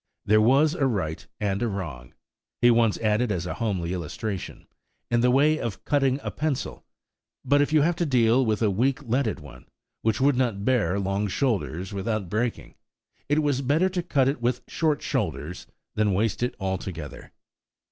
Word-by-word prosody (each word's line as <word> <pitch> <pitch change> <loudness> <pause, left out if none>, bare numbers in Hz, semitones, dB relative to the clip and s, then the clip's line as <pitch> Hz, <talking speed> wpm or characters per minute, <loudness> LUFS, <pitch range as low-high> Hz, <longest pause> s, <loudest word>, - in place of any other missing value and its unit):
There 110 +1 +4
was 140 +7 +4
a 145 -6 +1
right 90 -10 -3
and 100 -1 -1
a 120 - +1
wrong–he 95 - -3
once 115 -2 +3
added 110 +1 +1
as 90 -3 -2
a 90 - -3
homely 95 -7 -2
illustration–in 95 +6 -5
the 125 - +4
way 150 +5 +4
of 115 -4 -5
cutting 135 -2 +2
a - - -3
pencil; 150 -3 -3 0.6
but 145 0 +4
if 145 - +1
you 155 -1 +4
have 170 +2 +2
to 170 - 0
deal 125 -1 +4
with 110 -1 0
a 105 - +3
weak 130 +8 0
leaded 125 -2 0
one, 75 -3 -13 0.3
which 110 -1 0
would 140 +1 +3
not 115 -6 -1
bear 105 -8 +2
long 100 +1 -1
shoulders 95 - -1
without 100 -1 -2
breaking, 115 +2 -2 0.6
it 150 +1 +2
was 140 -2 +1
better 150 +8 +2
to 180 -1 -2
cut 140 -6 +1
it 135 -2 -1
with 125 +1 0
short 155 -3 0
shoulders 85 +5 -3 0.3
than 105 -3 +1
waste 110 +2 0
it 125 - -1
altogether. 95 -6 -5
115 Hz, 170 wpm, -25 LUFS, 100-135 Hz, 0.6 s, There